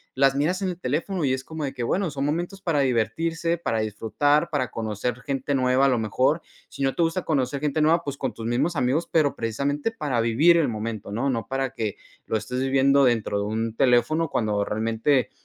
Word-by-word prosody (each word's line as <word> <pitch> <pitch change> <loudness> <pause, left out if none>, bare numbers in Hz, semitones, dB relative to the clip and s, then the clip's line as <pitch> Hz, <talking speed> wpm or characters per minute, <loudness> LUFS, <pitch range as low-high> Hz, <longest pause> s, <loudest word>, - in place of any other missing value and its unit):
las 135 0 +3
miras 170 +7 0
en 190 - 0
el 175 0 -5
teléfono 160 +5 -1
y 130 - +2
es 130 0 -3
como 160 +1 -6
de 140 -1 -3
que 125 - -6
bueno, 175 +7 0
son 135 0 -3
momentos 175 +6 -2
para 155 -6 +1
divertirse, 165 +8 0
para 115 -9 -1
disfrutar, 145 +9 +1
para 135 -5 0
conocer 115 +2 -3
gente 140 0 -2
nueva 130 +1 +3
a - - +5
lo 125 - +2
mejor. 130 +9 +1 0.3
Si 140 - -5
no 135 - +1
te - - -1
gusta 165 +2 +1
conocer 140 -2 0
gente 150 +1 0
nueva, 165 +2 +3
pues 140 -3 -4
con - - -2
tus 115 - -8
mismos 125 +9 0
amigos, 145 +4 0
pero 155 -4 +2
precisamente 140 - -1
para 145 - -1
vivir 145 +10 +4
el 155 -5 +2
momento, 110 -2 -5
¿no? 130 +6 0
No 115 -3 -3
para 135 -1 -2
que 110 -6 -3 0.3
lo 110 - +1
estés 125 +3 -4
viviendo 135 +1 +4
dentro 115 -4 +1
de 100 - -1
un 110 +1 -2
teléfono 140 +7 +2
cuando 105 -3 0
realmente, 115 +4 0
135 Hz, 215 wpm, -24 LUFS, 115-155 Hz, 0.3 s, a